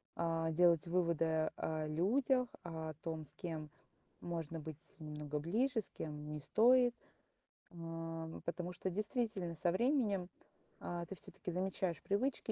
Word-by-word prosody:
а, 165 -1 +1
делать 170 0 +5
выводы 165 -2 +2
о 155 -1 -1
людях, 245 - +3 0.2
о 160 -2 -4
том, 160 -2 -3
с 145 - -17
кем 155 -2 -4 0.5
можно 165 -2 -3
быть 155 0 -7 0.2
немного 150 -1 -4
ближе, 225 - +2
с - - -15
кем 150 -1 -4
не 150 - -3
стоит. 245 - +5 0.8
Ам, 165 -1 -5
потому 175 +1 -2
что 185 +1 -2
действительно 205 -3 -1
со 175 - +4
временем, 210 -4 +2 0.5
а, 175 0 -3
ты 195 - -6
всё-таки 180 +2 -7
замечаешь 185 -1 -1
привычки 225 +3 0
170 Hz, 135 wpm, -38 LUFS, 160-195 Hz, 0.8 s, делать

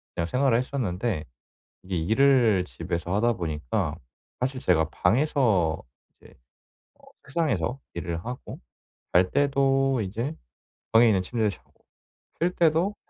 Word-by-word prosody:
그냥 85 - -1
생활을 130 +2 +2
했었는데 110 - -2 0.6
이게 95 -1 -3
일을 110 +1 +3
집에서 85 +1 -4
하다 120 +3 +2
보니까 80 - -2 0.4
사실 130 +1 -2
제가 80 -3 +2
방에서 115 - +2 0.4
이제 - - -18 0.6
어 - - -28 0.2
책상에서 135 - -1
일을 85 0 -4
하고 125 +1 -7 0.5
잘 90 +1 +4
때도 135 -2 +2
이제 115 +10 -3 0.6
방에 115 +1 +6
있는 100 -4 +3
침대에서 105 +1 -1
자고 - - -31 0.7
쉴 175 - +2
때도 170 +5 +2
115 Hz, 260 characters per minute, -26 LUFS, 90-135 Hz, 0.7 s, 방에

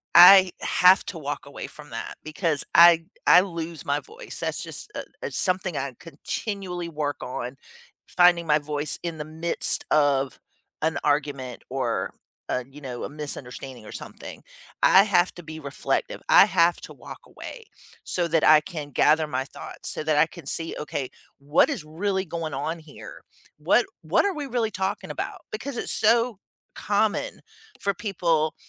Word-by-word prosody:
I 185 +1 +10
have 180 +1 +5
to 175 - -6
walk 145 -1 -5
away 140 - -8
from 150 -1 -13
that 115 0 -6
because 155 -1 -1
I 170 0 +8 0.2
I 180 - +8
lose 170 -4 -6
my 145 +1 0
voice, 470 +3 -10
that's - - -2
just, 420 - -8
uh - - -3 0.2
uh, - - -2
something 185 -3 0
I 135 -1 -3
continually 180 +2 -5
work 150 -2 -3
on, 125 +1 -5 0.5
finding 175 -2 +4
my 150 0 +4
voice 145 0 -3
in 165 -2 -4
the 150 - -4
midst 160 +2 +3
of 140 -4 +2 0.4
an 160 +1 0
argument 140 -4 -1
or, 120 -7 -2 0.4
uh, 125 - -1
you 145 +2 -13
know, 125 -3 -6
a - - -4
misunderstanding 135 -5 -7
or - - -10
something. - - -9 0.4
I 195 - +7
have 185 -4 +2
to 175 - -10
be 155 0 -8
reflective. 140 -1 -3
I - - +8
have 170 +1 +2
to - - -10
walk - - -11
away 460 -3 -10 0.4
so 175 -2 -1
that 160 -1 +2
I 155 0 +7
can 155 -4 -7
gather 155 +3 +3
my 130 -2 -2
thoughts, - - -8
so - - -4
that 155 -1 +1
I 150 - +6
can 170 -5 -13
see, 165 +3 0
"Okay, 140 -3 -4 0.3
what 145 +3 +3
is 150 - -3
really 190 +4 -2
going 160 -3 -5
on 160 +4 -3
here? 155 -2 -12 0.4
What - - +3 0.2
what - - +2
are 400 - +1
we 295 -2 -4
really 230 -3 -1
talking 190 +2 -3
about?" - - -5
Because 280 - -5
it's - - -3
so 230 -3 +2 0.4
common 210 +1 -1 0.4
for 200 0 0
people 170 -6 0
160 Hz, 170 wpm, -25 LUFS, 145-180 Hz, 0.5 s, I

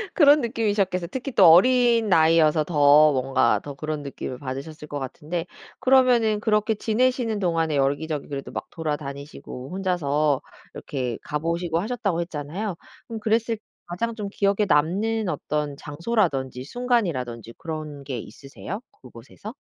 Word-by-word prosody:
그런 295 -2 +6
느낌이셨겠어 205 -7 0
특히 260 +8 -5
또 - - +5
어린 235 +5 +5
나이여서 160 -3 +4
더 150 -1 +6
뭔가 130 -5 +2
더 145 - -7
그런 155 +1 -4
느낌을 135 -2 -6
받으셨을 140 +3 -7
것 145 -1 -5
같은데 155 +6 -5 0.3
그러면은 250 -5 +4
그렇게 215 0 +1
지내시는 230 0 0
동안에 165 -4 0
여기저기 145 +2 -1
그래도 140 -2 -6
막 - - -5
돌아다니시고 140 -4 -6
혼자서 155 -7 0 0.3
이렇게 125 -5 -4
가 150 - -3
보시고 170 +1 -1
하셨다고 200 -5 -1
했잖아요. 170 +5 -4 0.3
그럼 225 -1 -6
그랬을 225 +1 0 0.3
가장 230 +7 -3
좀 210 -3 -5
기억에 200 +1 +1
남는 200 +7 +1
어떤 150 -3 -2
장소라든지 145 - -1
순간이라든지 145 - -2
그런 155 -3 -6
게 130 -3 -4
있으세요 140 - -8 0.2
그 125 - -13
곳에서? 135 - -11
165 Hz, 355 characters per minute, -24 LUFS, 145-215 Hz, 0.3 s, 그런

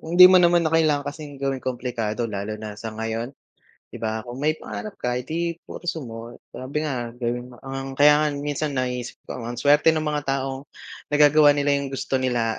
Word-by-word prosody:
hindi 175 +3 +7
mo 185 0 +8
naman 175 -1 +4
na 160 - 0
kailangan 155 -3 +3
kasing 145 -2 -10
gawing 135 -1 -2
komplikado 120 -3 -3
lalo 105 0 -4
na 105 -1 -7
sa 110 +2 -7
ngayon, 115 +4 -4 0.6
'di - - -9
ba? 110 +1 -2
Kung 125 +4 -7
may 155 +1 +1
pangarap 215 -2 -7
ka, 125 0 -1
eh, 125 - -2
'di 170 +4 -3
pursue 165 -3 -5
mo. 115 0 -8 0.2
Sabi 140 +4 -4
nga 120 -5 -3
gawin 120 0 -4
mo - - -14
ang 135 0 -5
kaya 150 +1 +6
nga - - +2
minsan 145 0 -2
naiisip 125 -1 -2 0.2
ko, - - -4
ang 120 +1 -5
suwerte 145 +5 +4
nung 155 -1 -1
mga 150 -1 -3
taong 135 0 -2 0.4
nagagawa 150 0 +5
nila 145 0 +1
yung 140 - -3
gusto 135 0 -1
nila 120 -3 0
135 Hz, 200 wpm, -24 LUFS, 120-150 Hz, 0.6 s, mo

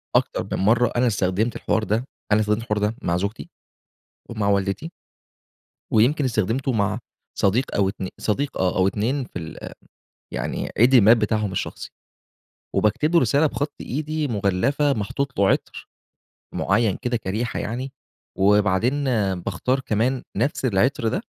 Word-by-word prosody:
أكتر - - +1
من - - 0
مرة 115 +4 +3
أنا 125 +1 +3
استخدمت 100 +2 0
الحوار 110 +1 0
ده، 110 +4 0 0.3
أنا 105 - +5
استخدمت 105 +1 0
الحوار 105 -2 -1
ده 105 +2 0
مع 85 +1 0
زوجتي 100 +4 -4 0.8
ومع 105 -3 -1
والدتي. 100 - 0 1.0
ويمكن 130 +7 +3
استخدمته 120 +3 0
مع 105 0 0 0.4
صديق 110 +7 +1
أو 100 -1 +2
اتن 95 -2 -5
صديق 135 +6 -1
آه، 95 -1 0
أو 95 0 +4
اتنين 120 +8 -1
في - - -7
ال 80 -1 -8 0.6
يعني - - -3
عيد 125 +5 +5
الميلاد 115 0 +7
بتاعهم 105 -2 0
الشخصي، 95 - -4 0.9
وباكتبله 150 - +3
رسالة 145 +1 +3
بخط 145 +1 -3
إيدي، 155 +2 -2
مغلفة، 120 +7 +1
محطوط 135 +5 -3
له 100 -1 +4
عطر، - - -2 0.7
معيّن 105 +1 +2
كده 120 -2 0
كريحة 110 +4 -3
يعني، 125 +5 -4 0.5
وبعدين 105 +7 +3 0.4
باختار 130 +8 -1
كمان 125 +2 0
نفس 140 -1 0
العطر 120 +2 +1
ده، 180 - -1
110 Hz, 140 wpm, -23 LUFS, 100-130 Hz, 1.0 s, الميلاد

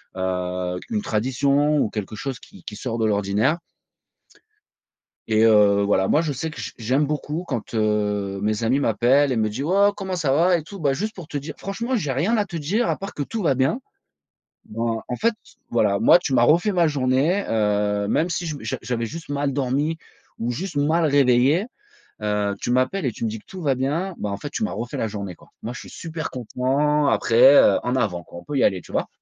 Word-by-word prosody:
heu, 90 -1 -2
une 215 -2 0
tradition, 140 - +1
ou 110 - +1
quelque 105 0 -5
chose 130 +2 -5
qui - - -16
qui 105 - -7
sort 115 +1 -4
de 110 - +2
l'ordinaire. 105 +8 +1 1.7
Et 110 0 +2
heu, 105 -2 +5
voilà 100 -1 +2
moi 155 - +3
je 155 -3 -2
sais 155 +4 -4
que - - -8
j - - -5
j'aime 130 +6 +1
beaucoup 150 +3 -3
quand, 120 -6 -4
heu, 105 -2 0
mes 105 +1 0
amis 125 +5 +2
m'appellent 130 +3 +3
et 120 - 0
me 110 -1 +1
dit: 130 +6 -4
«Waouh 200 +6 +4
comment 190 -2 -4
ça 150 -6 0
va 175 +5 +4
et - - -4
tout? 195 +5 -10
Bah, 140 -4 +1
juste 215 +9 -3
pour 175 -5 -9
te - - -10
dire 145 +3 -6
franchement 235 +6 -3
j'ai 155 - -1
rien 175 - +1
à 210 - +1
te 175 -3 -9
dire 195 +11 0
à - - +1
part 195 - -7
que 145 - -2
tout 225 +9 -4
va 145 -8 +2
bien». 135 - +1 0.9
Ben, 115 0 -2
en 125 - -2
fait 230 - +2 0.4
voilà, 105 -4 +2
moi 175 - +6
tu 135 -6 -2
m'as 120 - +4
refait 170 - +4
ma 175 -3 +3
journée, 145 +7 +1
heu, 105 -2 +1
même 165 +10 +1
si 175 0 -2
je 155 -2 -3
m - - -11
j'a 130 - -3
j'avais 115 -2 -2
juste 165 +3 -8
mal 140 -1 -1
dormi 140 +4 0 0.4
ou 115 - -2
juste 165 +6 -5
mal 155 +3 +2
réveillé, 140 - +3 0.6
heu, 105 -1 0
tu 120 - -1
m'appelles 130 +8 +1
et 125 - +1
tu 115 - -5
me - - 0
dis 110 +1 -6
que - - -26
tout 190 -1 -9
va 140 -5 +1
bien, 160 +8 -2
ben 105 - -2
en 100 - -3
fait 145 - -6
tu 225 - -3
m'as 215 - -1
refait 120 +2 -5
la 115 - -1
journée 100 -4 -6
quoi. - - -21
Moi 120 - -4
je - - -8
suis - - -11
super 160 -1 -6
content 140 +5 0
après, 130 +4 +5
heu, - - +6
en 125 +1 -1
avant 95 -8 -1
quoi 85 - -11
on 85 - -14
peut 145 - -3
y - - +3
aller. 95 -2 +2
Tu - - -15
vois? - - 0
135 Hz, 230 wpm, -23 LUFS, 110-160 Hz, 1.7 s, moi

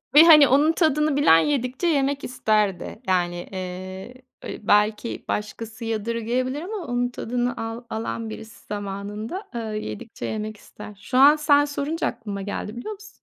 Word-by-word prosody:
Ve 305 - +11
hani 305 -4 +9
onun 290 +5 +4
tadını 305 -3 +2
bilen, 275 - +6
yedikçe 260 - 0
yemek 280 -2 +1
isterdi. 215 -4 0
Yani, 175 -2 +1 0.2
eee, 185 +3 -6 0.3
ııı, - - -6
belki 210 +2 +2
başkası 220 +2 -4
yadırgayabilir 230 +5 -2
ama 390 +6 -5
onun 245 0 0
tadını 245 0 -2
al 225 +1 -5
alan 225 0 -4
birisi, 220 0 -10
zamanında, 205 - -5
eee, - - -1
yedikçe 215 - -6
yemek 215 0 -4
ister. 210 0 -12
Şu 255 - -2
an 285 +3 +8
sen 290 -1 +4
sorunca 295 +3 -2
aklıma 210 -5 -5
geldi, 205 +2 -5
biliyor 340 - -5
musun? 410 0 -13
230 Hz, 150 wpm, -24 LUFS, 210-285 Hz, 0.3 s, Ve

